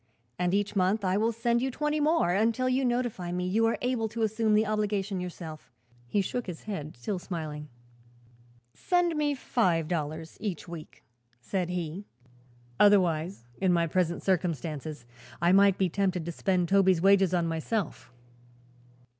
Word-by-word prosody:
"And 180 Hz, 0 st, +1 dB
each 205 Hz, +1 st, -1 dB
month 195 Hz, +2 st, +1 dB
I 185 Hz, 0 st, +2 dB
will 220 Hz, +3 st, +2 dB
send 235 Hz, +1 st, 0 dB
you 265 Hz, -, 0 dB
twenty 300 Hz, +3 st, -1 dB
more, 305 Hz, -, +2 dB
until 225 Hz, +6 st, +1 dB
you 255 Hz, +1 st, +1 dB
notify 240 Hz, -8 st, -1 dB
me 180 Hz, 0 st, -2 dB
you 225 Hz, +5 st, +2 dB
are 230 Hz, -, 0 dB
able 245 Hz, -3 st, 0 dB
to 225 Hz, +1 st, -3 dB
assume 220 Hz, 0 st, +2 dB
the 215 Hz, +1 st, +3 dB
obligation 205 Hz, -2 st, -1 dB
yourself." 165 Hz, -4 st, -8 dB, 0.4 s
He 200 Hz, +11 st, +1 dB
shook 240 Hz, +5 st, -3 dB
his 175 Hz, -3 st, -7 dB
head, 155 Hz, -, -6 dB
still 180 Hz, +11 st, -3 dB
smiling. 155 Hz, -4 st, -6 dB, 1.0 s
"Send 355 Hz, -2 st, +1 dB
me 295 Hz, -1 st, +1 dB
five 180 Hz, -, +1 dB
dollars 160 Hz, -1 st, -4 dB
each 195 Hz, -7 st, -4 dB
week," 165 Hz, -2 st, -10 dB, 0.4 s
said 180 Hz, +7 st, -2 dB
he. 180 Hz, +2 st, -4 dB, 0.7 s
"Otherwise, 180 Hz, -, +3 dB, 0.2 s
in 190 Hz, -2 st, +3 dB
my 170 Hz, -1 st, +3 dB
present 170 Hz, +1 st, 0 dB
circumstances, 155 Hz, -6 st, -2 dB, 0.3 s
I 170 Hz, +1 st, +3 dB
might 195 Hz, 0 st, +5 dB
be 190 Hz, -, +2 dB
tempted 185 Hz, -2 st, -1 dB
to 170 Hz, -, -3 dB
spend 180 Hz, +1 st, 0 dB
Toby's 190 Hz, -1 st, +4 dB
wages 195 Hz, -2 st, +5 dB
on 170 Hz, -1 st, +1 dB
myself." 165 Hz, -, -3 dB
190 Hz, 155 wpm, -28 LUFS, 170-220 Hz, 1.0 s, might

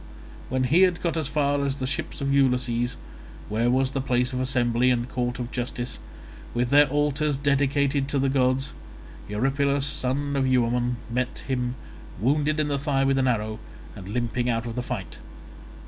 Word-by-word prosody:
When 130 Hz, 0 st, 0 dB
he 155 Hz, +8 st, +4 dB
had 180 Hz, -2 st, +4 dB
got 170 Hz, -2 st, -1 dB
as 160 Hz, -4 st, -1 dB
far 145 Hz, -1 st, +1 dB
as 140 Hz, -1 st, -1 dB
the 135 Hz, -2 st, -4 dB
ships 135 Hz, -, -3 dB
of 140 Hz, 0 st, 0 dB
Ulysses, 125 Hz, -3 st, +1 dB, 0.5 s
where 115 Hz, +3 st, +1 dB
was 130 Hz, +1 st, +2 dB
their 135 Hz, -, -2 dB
place 125 Hz, -1 st, 0 dB
of 125 Hz, -, -1 dB
assembly 125 Hz, -1 st, +2 dB
and 120 Hz, -1 st, +1 dB
court 125 Hz, 0 st, -2 dB
of 120 Hz, -2 st, -5 dB
justice, 120 Hz, 0 st, -4 dB, 0.6 s
with 120 Hz, 0 st, 0 dB
their 145 Hz, +1 st, +7 dB
altars 145 Hz, 0 st, +1 dB
dedicated 140 Hz, 0 st, +1 dB
to 145 Hz, -, -1 dB
the 135 Hz, 0 st, +2 dB
gods, 135 Hz, 0 st, +1 dB, 0.6 s
Eurypylus 135 Hz, +5 st, +1 dB
son 140 Hz, +1 st, -1 dB
of 135 Hz, -1 st, +1 dB
Euaemon, 125 Hz, -1 st, +2 dB, 0.2 s
met 125 Hz, +1 st, -2 dB
him, 125 Hz, -2 st, -1 dB, 0.4 s
wounded 150 Hz, +6 st, +1 dB
in 155 Hz, -, +1 dB
the 140 Hz, -1 st, -1 dB
thigh 140 Hz, -1 st, +1 dB
with 135 Hz, 0 st, +2 dB
an 130 Hz, -, +2 dB
arrow, 110 Hz, -2 st, -1 dB, 0.4 s
and 95 Hz, -3 st, -9 dB
limping 120 Hz, +2 st, -1 dB
out 115 Hz, 0 st, 0 dB
of 115 Hz, -, -4 dB
the 125 Hz, -, -2 dB
fight. 95 Hz, -10 st, -6 dB
130 Hz, 180 wpm, -25 LUFS, 120-140 Hz, 0.6 s, their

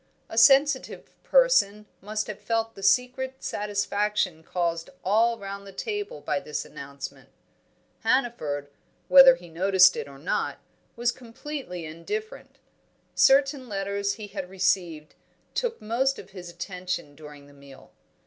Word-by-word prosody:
A -, -, -7 dB
sensitive 275 Hz, +5 st, +4 dB
person -, -, +3 dB, 0.2 s
must 215 Hz, +2 st, -3 dB
have 210 Hz, -, -7 dB
felt 225 Hz, 0 st, -1 dB
the 195 Hz, -, -12 dB
secret 250 Hz, +6 st, +1 dB
satisfaction 205 Hz, -4 st, -1 dB
caused 170 Hz, 0 st, -2 dB
all 230 Hz, +4 st, +3 dB
round 200 Hz, 0 st, -8 dB
the -, -, -9 dB
table 415 Hz, -, -5 dB
by 185 Hz, -, -1 dB
this 150 Hz, -5 st, -5 dB
announcement; 140 Hz, 0 st, -9 dB, 0.7 s
Hannaford, 155 Hz, -, -1 dB, 0.4 s
whether 270 Hz, -1 st, +9 dB
he 175 Hz, -, -14 dB
noticed 185 Hz, +2 st, +5 dB
it -, -, -5 dB
or 140 Hz, -1 st, -12 dB
not, 150 Hz, +6 st, -2 dB, 0.4 s
was 240 Hz, +1 st, +1 dB
completely 245 Hz, -, -7 dB
indifferent; 425 Hz, -, -6 dB, 0.6 s
certain 275 Hz, -1 st, +3 dB
letters 200 Hz, 0 st, -2 dB
he 210 Hz, +1 st, -8 dB
had 195 Hz, -3 st, -7 dB
received 180 Hz, -5 st, -1 dB, 0.4 s
took 470 Hz, -2 st, -2 dB
most 255 Hz, +5 st, 0 dB
of 195 Hz, -, -11 dB
his 180 Hz, -2 st, -9 dB
attention 180 Hz, -3 st, -5 dB
during 150 Hz, -1 st, -13 dB
the 145 Hz, -, -18 dB
meal. 140 Hz, -1 st, -16 dB
200 Hz, 130 wpm, -26 LUFS, 175-250 Hz, 0.7 s, whether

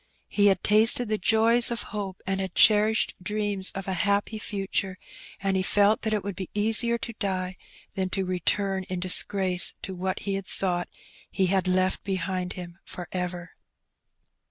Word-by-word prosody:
He 205 Hz, -1 st, +3 dB
had 195 Hz, -, +2 dB
tasted 220 Hz, +2 st, +4 dB
the 215 Hz, -1 st, 0 dB
joys 225 Hz, +4 st, +4 dB
of 235 Hz, -1 st, -2 dB
hope 195 Hz, -3 st, -5 dB
and 195 Hz, 0 st, -1 dB
had 190 Hz, -2 st, -5 dB
cherished 215 Hz, 0 st, +4 dB
dreams 205 Hz, -1 st, +1 dB
of 195 Hz, 0 st, -6 dB
a 190 Hz, -, -1 dB
happy 200 Hz, +4 st, 0 dB
future, 195 Hz, -2 st, -3 dB, 0.4 s
and 195 Hz, -1 st, -1 dB
he 190 Hz, -, +1 dB
felt 205 Hz, +3 st, +3 dB
that 220 Hz, -, -1 dB
it 210 Hz, -2 st, -1 dB
would 200 Hz, -1 st, -5 dB
be 190 Hz, -1 st, -6 dB
easier 225 Hz, +3 st, +3 dB
to 230 Hz, 0 st, -6 dB
die 185 Hz, -3 st, -2 dB, 0.4 s
than 190 Hz, -1 st, -2 dB
to 190 Hz, 0 st, -1 dB
return 190 Hz, +2 st, -1 dB
in 185 Hz, -1 st, -4 dB
disgrace 185 Hz, 0 st, +2 dB
to 190 Hz, -, -5 dB
what 185 Hz, +1 st, -3 dB
he 200 Hz, -, -3 dB
had 195 Hz, -1 st, -4 dB
thought 175 Hz, -2 st, -2 dB, 0.4 s
he 190 Hz, -, 0 dB
had 190 Hz, 0 st, +1 dB
left 185 Hz, 0 st, +1 dB
behind 185 Hz, -1 st, -3 dB
him 175 Hz, -1 st, -9 dB
for 180 Hz, -, -8 dB
ever. 180 Hz, -2 st, -4 dB
195 Hz, 175 wpm, -26 LUFS, 185-210 Hz, 0.4 s, tasted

